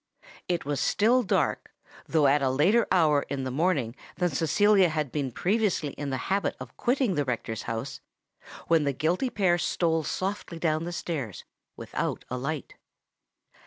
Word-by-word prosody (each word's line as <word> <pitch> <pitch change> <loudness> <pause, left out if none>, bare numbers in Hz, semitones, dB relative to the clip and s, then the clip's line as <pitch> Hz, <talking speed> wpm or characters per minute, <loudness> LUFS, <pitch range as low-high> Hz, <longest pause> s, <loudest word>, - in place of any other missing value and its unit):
It 175 -4 -1
was 145 -1 -1
still 240 +5 +3
dark—though 160 -6 -1
at 140 +1 +4
a 135 - +2
later 175 - +3
hour 155 -6 +4
in 135 -1 -3
the 130 - -3
morning 140 -5 0 0.2
than 180 -1 +1
Cecilia 185 +6 +4
had 155 -4 -2
been 140 -4 -2
previously 190 - 0
in 145 0 -5
the 130 - -1 0.2
habit 200 - 0
of - - -9
quitting 250 -4 +1
the 145 -3 +1
rector's 115 -3 -3
house—when 140 +6 -4
the 140 -1 0
guilty 175 - 0
pair 185 -6 +2
stole 165 -2 +1
softly 185 +2 -3
down 165 +1 -1
stairs, 155 - -4 0.3
without - - -4
a 125 - -1
light. 145 +1 -4
160 Hz, 150 wpm, -27 LUFS, 140-185 Hz, 0.3 s, at